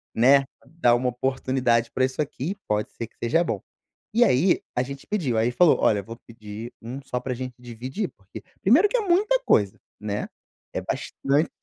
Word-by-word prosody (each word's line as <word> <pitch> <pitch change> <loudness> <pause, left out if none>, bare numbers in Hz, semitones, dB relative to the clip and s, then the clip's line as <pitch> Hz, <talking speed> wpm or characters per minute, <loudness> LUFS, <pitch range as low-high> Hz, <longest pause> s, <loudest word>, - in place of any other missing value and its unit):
né, 135 +4 +6 0.2
dar 135 -6 +2
uma 125 +1 +1
oportunidade 125 -2 0
pra 130 - 0
isso 130 - -5
aqui, 150 +6 -3
pode 105 0 0
ser 115 - -6
que - - -35
seja 165 +9 +3
bom". - - -2 0.5
E 240 +2 +5
aí, 170 - +3 0.2
a 125 - +3
gente 135 +1 -8
pediu, 160 - -1
aí 115 +2 +3
falou: 170 +4 +5
"Olha, 105 - +3
eu - - -6
vou 115 +1 -8
pedir 110 +1 -8
1 125 +4 -6
só 125 -2 -3
pra 130 0 -3
gente 125 0 -6
dividir 125 - -5
porque" 100 0 -11 0.2
primeiro 290 - +5
que - - +1
é - - +1
muita 415 +6 +3
coisa, 100 -2 +3 0.2
né. 105 -1 -3 0.5
É - - -1
bastante 145 +4 -1
130 Hz, 190 wpm, -25 LUFS, 115-165 Hz, 0.5 s, né